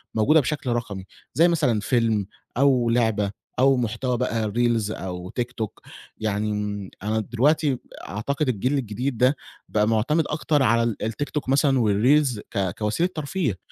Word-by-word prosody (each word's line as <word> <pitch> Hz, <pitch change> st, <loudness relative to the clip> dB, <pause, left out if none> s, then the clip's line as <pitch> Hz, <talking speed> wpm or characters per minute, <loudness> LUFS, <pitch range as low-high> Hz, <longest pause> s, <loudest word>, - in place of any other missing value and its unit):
موجودة 145 Hz, +9 st, +5 dB
بشكل 145 Hz, 0 st, -2 dB
رقمي، 105 Hz, -5 st, -3 dB, 0.3 s
زي 165 Hz, +3 st, +5 dB
مثلًا 145 Hz, -10 st, +2 dB
فيلم 110 Hz, -2 st, +1 dB, 0.3 s
أو 130 Hz, -4 st, +3 dB
لعبة 110 Hz, -4 st, +1 dB, 0.3 s
أو 135 Hz, +1 st, +5 dB
محتوى 120 Hz, +1 st, -1 dB
بقى 110 Hz, -2 st, -1 dB
reels 115 Hz, -3 st, +2 dB
أو 90 Hz, -3 st, -6 dB
TikTok 120 Hz, -3 st, -4 dB, 0.3 s
يعني 105 Hz, 0 st, -1 dB
امم، 105 Hz, -2 st, -3 dB
أنا 110 Hz, +1 st, 0 dB
دلوقتي 135 Hz, +7 st, +2 dB
ب -, -, -11 dB, 0.3 s
أعتقد 135 Hz, +7 st, -1 dB
الجيل 125 Hz, +4 st, 0 dB
الجديد 125 Hz, +1 st, -3 dB
ده 130 Hz, +4 st, +4 dB, 0.3 s
بقى 105 Hz, 0 st, +2 dB
معتمد 115 Hz, +9 st, +2 dB
أكتر 150 Hz, -2 st, +1 dB
على 115 Hz, -1 st, +3 dB
ال 115 Hz, -2 st, -1 dB
الTikTok 135 Hz, +5 st, -3 dB
مثلًا 135 Hz, -1 st, +3 dB
والreels 120 Hz, +4 st, +3 dB
ك 95 Hz, -2 st, -1 dB
كوسيلة 110 Hz, +12 st, 0 dB
ترفيه. 150 Hz, -, -2 dB
120 Hz, 150 wpm, -24 LUFS, 105-140 Hz, 0.3 s, موجودة